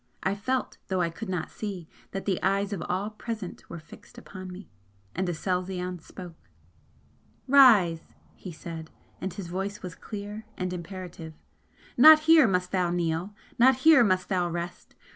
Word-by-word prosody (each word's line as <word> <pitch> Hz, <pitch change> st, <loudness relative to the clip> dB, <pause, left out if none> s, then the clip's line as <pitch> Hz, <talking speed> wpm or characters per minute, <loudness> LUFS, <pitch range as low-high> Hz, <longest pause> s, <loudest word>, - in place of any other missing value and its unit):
I 190 Hz, -, +1 dB
felt, 255 Hz, +6 st, -3 dB
though 190 Hz, -1 st, -1 dB
I 170 Hz, -1 st, 0 dB
could 205 Hz, +5 st, -7 dB
not 180 Hz, -3 st, -3 dB
see, 195 Hz, -6 st, -6 dB, 0.2 s
that 195 Hz, -, -6 dB
the 190 Hz, -3 st, -1 dB
eyes 200 Hz, +1 st, 0 dB
of 185 Hz, -, -4 dB
all 195 Hz, +4 st, -1 dB
present 215 Hz, -3 st, -7 dB
were 170 Hz, -, -7 dB
fixed 155 Hz, 0 st, -15 dB
upon 185 Hz, -1 st, -9 dB
me. 185 Hz, +3 st, -10 dB, 0.5 s
And 185 Hz, 0 st, -2 dB
Aselzion 180 Hz, +1 st, -3 dB
spoke: 165 Hz, -, -12 dB, 1.0 s
"Rise!" 215 Hz, -12 st, +5 dB, 0.2 s
he 185 Hz, -, -9 dB
said 160 Hz, 0 st, -8 dB, 0.3 s
and 190 Hz, -, -3 dB
his 195 Hz, +1 st, -7 dB
voice 195 Hz, +4 st, -4 dB
was 180 Hz, -2 st, -6 dB
clear 205 Hz, +3 st, -7 dB
and 180 Hz, -1 st, -3 dB
imperative 175 Hz, -3 st, -8 dB, 0.6 s
"Not 310 Hz, +5 st, +9 dB
here 315 Hz, -4 st, +6 dB
must 180 Hz, -2 st, 0 dB
thou 180 Hz, -2 st, +1 dB
kneel 175 Hz, +3 st, -2 dB, 0.2 s
not 260 Hz, +2 st, +6 dB
here 315 Hz, -6 st, +8 dB
must 185 Hz, -4 st, +1 dB
thou 180 Hz, -3 st, 0 dB
rest! 170 Hz, +1 st, -6 dB
185 Hz, 160 wpm, -27 LUFS, 175-205 Hz, 1.0 s, Not